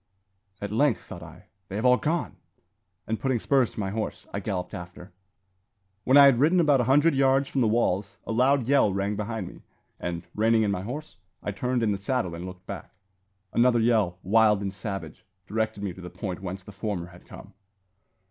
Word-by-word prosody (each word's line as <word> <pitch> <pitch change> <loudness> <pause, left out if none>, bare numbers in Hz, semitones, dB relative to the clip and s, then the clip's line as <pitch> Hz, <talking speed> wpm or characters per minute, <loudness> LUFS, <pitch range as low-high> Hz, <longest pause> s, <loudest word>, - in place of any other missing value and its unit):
"At 100 -1 -4
length," 115 -3 +2
thought 85 - -10
I, 85 -2 -12 0.2
"they 95 - -7
have 110 +4 -2
all 125 0 +6
gone!" 160 +4 -2 0.7
and 110 0 -2
putting 130 -2 0
spurs 130 +1 +2
to - - -8
my 95 -2 -2
horse, 110 +1 -4
I 100 - -1
galloped 95 -3 -4
after. 90 +1 -9 0.9
When 130 +2 +5
I 140 - +10
had 135 -4 +5
ridden 165 +6 +4
about 145 -6 +4
a - - 0
hundred 145 +6 +4
yards 135 0 +3
from 135 - 0
the 115 - +3
walls, 105 -3 0
a - - -4
loud 130 +2 +3
yell 135 -5 +4
rang 100 +2 -1
behind 105 -2 -4
me; - - -12 0.4
and, 85 0 -4
reining 110 +1 +3
in 105 - +1
my 90 -2 -2
horse, 140 +5 -7 0.3
I 105 - -2
turned 125 +4 -1
in 110 - +2
the 100 - -2
saddle 100 -4 -1
and 85 +2 -6
looked 90 0 -11
back. - - -8 0.6
Another 120 0 +4
yell, 110 -6 +2
wild 105 +1 +4
and 95 -1 -3
savage, 95 0 -6 0.2
directed 110 0 -2
me 95 -3 -3
to 95 - -12
the 90 - -7
point 90 +1 -6
whence 95 0 -6
the 105 - -11
former 100 -3 -4
had 90 0 -17
come. - - -12
110 Hz, 205 wpm, -26 LUFS, 95-125 Hz, 0.9 s, I